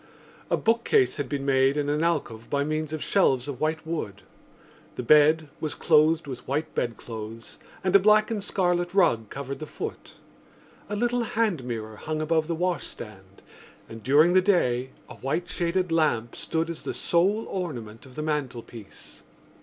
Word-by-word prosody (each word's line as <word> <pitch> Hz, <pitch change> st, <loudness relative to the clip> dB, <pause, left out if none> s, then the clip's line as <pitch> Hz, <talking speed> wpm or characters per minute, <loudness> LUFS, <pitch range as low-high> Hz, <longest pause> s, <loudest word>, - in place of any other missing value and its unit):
A -, -, +2 dB
bookcase 235 Hz, -, +2 dB
had 145 Hz, -4 st, -3 dB
been 140 Hz, -1 st, -3 dB
made 135 Hz, +1 st, +3 dB
in 145 Hz, -1 st, 0 dB
an 150 Hz, +2 st, 0 dB
alcove 135 Hz, -9 st, -1 dB
by 140 Hz, 0 st, +1 dB
means 155 Hz, +1 st, -2 dB
of 155 Hz, -1 st, -3 dB
shelves 135 Hz, -10 st, +2 dB
of 135 Hz, -3 st, -6 dB
white 155 Hz, +1 st, -1 dB
wood. 105 Hz, -, -4 dB, 0.7 s
The 125 Hz, -, -4 dB
bed 155 Hz, +4 st, +5 dB
was 155 Hz, -, -3 dB
clothed 155 Hz, 0 st, +3 dB
with 130 Hz, -3 st, -8 dB
white 150 Hz, +4 st, -2 dB
bedclothes 115 Hz, -1 st, -5 dB, 0.2 s
and 185 Hz, 0 st, +1 dB
a -, -, +10 dB
black 215 Hz, +3 st, +4 dB
and 210 Hz, -3 st, -2 dB
scarlet 175 Hz, -2 st, 0 dB
rug 115 Hz, -, +3 dB
covered 140 Hz, 0 st, -6 dB
the 155 Hz, -, -6 dB
foot. -, -, -7 dB, 0.7 s
A 205 Hz, -, -2 dB
little 240 Hz, +3 st, +1 dB
hand 220 Hz, -, 0 dB
mirror 110 Hz, -3 st, -5 dB
hung 155 Hz, +5 st, -3 dB
above 155 Hz, 0 st, +1 dB
the 170 Hz, -, -1 dB
washstand 105 Hz, -, -5 dB, 0.4 s
and 115 Hz, 0 st, -10 dB
during 150 Hz, +9 st, +5 dB
the 185 Hz, -, +6 dB
day 130 Hz, -10 st, +2 dB, 0.2 s
a -, -, -11 dB
white 155 Hz, +7 st, -2 dB
shaded 175 Hz, +1 st, -1 dB
lamp 135 Hz, -8 st, +1 dB
stood 165 Hz, 0 st, -2 dB
as 165 Hz, -, -8 dB
the -, -, -5 dB
sole 195 Hz, +6 st, +1 dB
ornament 120 Hz, -, -5 dB
of 130 Hz, -, -16 dB
the 150 Hz, -, -3 dB
mantelpiece. 125 Hz, -8 st, -5 dB
155 Hz, 170 wpm, -26 LUFS, 125-175 Hz, 0.7 s, a